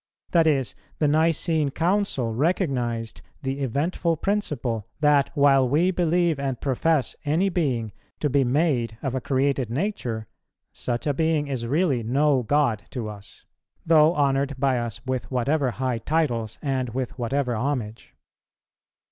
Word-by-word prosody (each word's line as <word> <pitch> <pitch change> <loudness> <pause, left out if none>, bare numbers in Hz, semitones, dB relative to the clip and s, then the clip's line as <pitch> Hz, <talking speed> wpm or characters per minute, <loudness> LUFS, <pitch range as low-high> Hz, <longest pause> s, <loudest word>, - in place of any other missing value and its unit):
That 165 -2 +4
is, 135 -5 +1 0.2
the 150 - +2
Nicene 160 0 +2
Council 165 - 0
recognized 120 - -1 0.2
the 135 +1 -2
eventful 155 +6 0
principle, 150 - -2
that, 150 -2 +3
while 135 -3 +4
we 165 +7 +3
believe 170 -3 +1
and 135 -3 -2
profess 140 0 +1
any 160 +7 +1
being 130 - -1 0.3
to 150 - +1
be 140 0 +2
made 125 -4 +1
of 135 -3 -2
a 130 - -2
created 135 -2 0
nature, 125 - -2 0.5
such 120 -1 -3
a 145 - +1
being 160 0 +1
is 130 -5 -3
really 145 -2 +1
no 135 +4 +2
God 120 -4 +1
to 115 -5 -4
us, 100 -1 -12 0.4
though 160 +1 +5
honoured 140 -1 +1
by 130 -2 +2
us 120 +1 -5
with 130 -1 -3
whatever 135 +2 +1
high 125 -1 -2
titles 120 -5 -1
and 130 -3 -1
with 130 -1 -4
whatever 125 +1 -1
homage. 115 -3 -3
140 Hz, 140 wpm, -24 LUFS, 120-155 Hz, 0.5 s, though